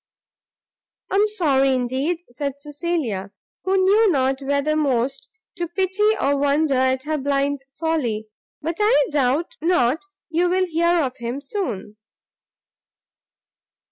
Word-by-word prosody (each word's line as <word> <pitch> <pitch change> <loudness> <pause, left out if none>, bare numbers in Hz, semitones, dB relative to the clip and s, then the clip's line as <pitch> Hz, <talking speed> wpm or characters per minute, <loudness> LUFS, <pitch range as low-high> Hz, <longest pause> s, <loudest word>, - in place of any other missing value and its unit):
"I - - 0
am 420 +1 +4
sorry, 275 -10 +2
indeed," 265 +8 -1
said 280 +2 -3
Cecilia, 290 - -3 0.4
who 380 +1 +2
knew 400 +4 +4
not 265 -2 +1
whether 285 +2 0
most 270 -4 0 0.3
to 345 - -2
pity 385 +5 +1
or 280 +1 +2
wonder 285 +1 +2
at 260 0 +2
her 305 +1 -1
blind 280 0 0 0.2
folly; 255 -10 -1 0.4
"but 330 +2 -2
I 420 -9 +4
doubt 295 - 0
not 320 -3 +2 0.3
you 345 +2 +2
will 370 +1 +2
hear 340 0 +2
of 255 -2 -3
him 240 +3 -4
soon." 270 - -4
290 Hz, 125 wpm, -22 LUFS, 265-345 Hz, 0.4 s, am